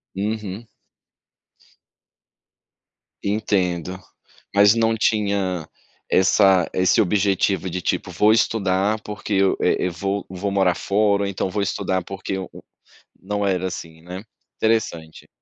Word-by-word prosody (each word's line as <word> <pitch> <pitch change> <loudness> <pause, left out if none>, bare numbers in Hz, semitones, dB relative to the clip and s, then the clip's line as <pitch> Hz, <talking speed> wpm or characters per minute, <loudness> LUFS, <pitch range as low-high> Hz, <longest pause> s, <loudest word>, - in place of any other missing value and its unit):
Uhum. 105 +1 -4 2.6
Entendo. 95 -4 -1 0.6
Mas 100 +1 +7
não 115 0 +2
tinha 100 -6 0 0.4
essa 95 -1 +4
esse 90 0 +3
objetivo, 95 -1 +1
de 90 +1 -4
tipo: - - -2
"Vou 105 +1 +4
estudar, 105 -1 +1
porque 105 0 -5
eu, 95 0 +3
eh, - - +2
eu - - -3
vou 100 +3 -3
vou 95 +2 -3
morar 95 -3 +2
fora", 100 0 +1
ou - - -1
então: 95 0 -2
"Vou 105 +1 -2
estudar, 95 -1 -1
porque 95 +1 -5
o 95 - -6
o". - - -12 0.6
Não 105 +1 -2
era 95 -1 0
assim, 80 -2 -8
né. 90 +4 -8 0.3
Interessante. 95 -8 -1
100 Hz, 125 wpm, -22 LUFS, 95-105 Hz, 2.6 s, Mas